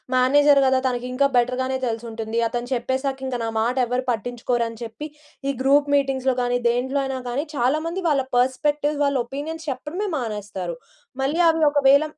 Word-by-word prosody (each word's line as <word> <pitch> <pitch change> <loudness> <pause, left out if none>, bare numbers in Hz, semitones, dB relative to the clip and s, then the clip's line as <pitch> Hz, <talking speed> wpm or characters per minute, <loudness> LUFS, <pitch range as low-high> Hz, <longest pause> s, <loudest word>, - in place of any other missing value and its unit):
Manager 285 +3 +5
కదా, 260 0 +3
తనకింకా 250 +2 0
better 245 +1 +2
గానే 260 0 -1
తెలిసుంటుంది. 225 -1 -4
అతను 240 +1 -4
చెప్పేసాకింక 265 +1 -2
నా 225 - -1
మాటెవరు 250 +1 0
పట్టించుకోరని 235 0 -2
చెప్పి, 230 +7 -7 0.4
ఈ - - 0
గ్రూప్ 285 +2 +3
మీటింగ్స్‌లో 265 -2 +1
కాని, 245 0 +1
దేంట్లో 255 +4 0
అయినా 265 -1 -3
కాని, 270 +5 -2
చాలా 260 +4 +2
మంది 355 +3 -3
వాళ్ళ 280 -3 +2
పర్స్‌పెక్టివ్స్, 290 +4 +1
వాళ్ళ 280 -1 +2
ఒపీనియన్స్ 310 +5 -6
చెప్పడమే 300 +10 -4
మానేస్తారు. 205 -7 -4 0.5
మళ్ళీ 295 +5 0
అవి 325 -1 +2
ఒకవేళ 280 0 +5
260 Hz, 150 wpm, -23 LUFS, 240-285 Hz, 0.5 s, Manager